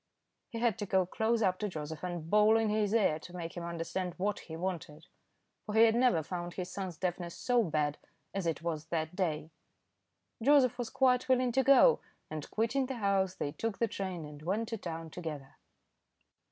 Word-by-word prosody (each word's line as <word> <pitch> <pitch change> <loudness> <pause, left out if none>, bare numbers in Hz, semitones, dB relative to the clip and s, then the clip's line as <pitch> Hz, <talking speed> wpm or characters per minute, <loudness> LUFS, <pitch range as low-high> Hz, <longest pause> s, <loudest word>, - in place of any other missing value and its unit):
He 235 - -6
had 230 -3 +1
to 205 - -3
go 190 -1 +3
close 220 +5 0
up 185 -2 +1
to 210 - -1
Joseph 155 -2 -6
and 175 -3 -4
bawl 210 +4 +5
in 225 -1 +1
his 210 -1 +1
ear 205 -9 +3
to 175 +3 -11
make 170 -1 -5
him 175 - -5
understand 170 +1 -3
what 200 +2 -1
he 160 - -9
wanted, 165 -4 -4 0.6
for 210 - -3
he 225 - +7
had 225 -1 +6
never 240 -9 +3
found 175 +1 -5
his 180 -1 -4
son's 185 -4 -5
deafness 175 -1 -3
so 245 -1 +2
bad 150 -6 0 0.3
as 195 -3 -2
it 165 0 -2
was 160 -2 -3
that 160 0 -2
day. 160 -4 -1 0.9
Joseph 255 -1 +4
was 240 -2 -2
quite 255 -1 +2
willing 255 -1 +3
to 265 +3 +3
go, 275 - +6 0.3
and 155 -2 -5
quitting 245 +5 0
the 265 - -4
house, 195 -4 +1
they 145 - -3
took 215 +7 -3
the 230 - +1
train 185 -5 -4
and 150 0 -10
went 205 +8 -1
to 225 - -3
town 165 -2 -6
together. 150 -6 -7
185 Hz, 195 wpm, -32 LUFS, 165-225 Hz, 0.9 s, he